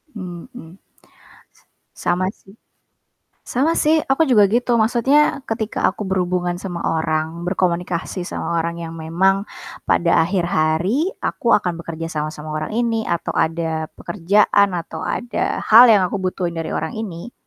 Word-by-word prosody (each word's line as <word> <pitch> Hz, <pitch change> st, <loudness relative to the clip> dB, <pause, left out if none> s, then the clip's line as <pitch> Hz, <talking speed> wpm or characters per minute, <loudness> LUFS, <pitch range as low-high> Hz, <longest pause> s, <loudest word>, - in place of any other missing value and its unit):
Mhm. 185 Hz, -, -10 dB, 0.7 s
S -, -, -27 dB, 0.4 s
sama 180 Hz, +1 st, +1 dB
sih. 195 Hz, -1 st, -19 dB, 0.9 s
Sama 280 Hz, +6 st, +1 dB
sih 310 Hz, +1 st, +3 dB
aku 280 Hz, +3 st, +2 dB
juga 215 Hz, -5 st, +6 dB
gitu 235 Hz, +4 st, +2 dB
maksudnya 245 Hz, +7 st, +3 dB
ketika 220 Hz, -1 st, 0 dB
aku 210 Hz, -, -4 dB
berhubungan 180 Hz, -2 st, -1 dB
sama 175 Hz, -3 st, -5 dB
orang, 160 Hz, +1 st, -1 dB
berkomunikasi 180 Hz, 0 st, -1 dB
sama 170 Hz, -1 st, -2 dB
orang 170 Hz, +1 st, -3 dB
yang 165 Hz, -1 st, -6 dB
memang 180 Hz, +5 st, 0 dB, 0.4 s
pada 170 Hz, -1 st, +3 dB
akhir 180 Hz, +1 st, 0 dB
hari 185 Hz, -, +1 dB, 0.2 s
aku 235 Hz, -, +2 dB
akan 180 Hz, -4 st, -3 dB
bekerja 165 Hz, 0 st, -6 dB
sama 150 Hz, 0 st, -2 dB
sama 155 Hz, 0 st, -8 dB
orang 155 Hz, +5 st, -4 dB
ini, 230 Hz, -2 st, 0 dB
atau 170 Hz, -1 st, -2 dB
ada 160 Hz, -1 st, -1 dB
pekerjaan 200 Hz, +2 st, +2 dB
atau 165 Hz, -1 st, -6 dB
ada 240 Hz, +8 st, -2 dB
hal 230 Hz, +3 st, +9 dB
yang 205 Hz, -4 st, +5 dB
aku 200 Hz, -, -3 dB
butuhin 180 Hz, -2 st, -2 dB
dari 160 Hz, -, -4 dB
orang 160 Hz, -, -3 dB
ini. 220 Hz, 0 st, -6 dB
180 Hz, 145 wpm, -20 LUFS, 165-220 Hz, 0.9 s, hal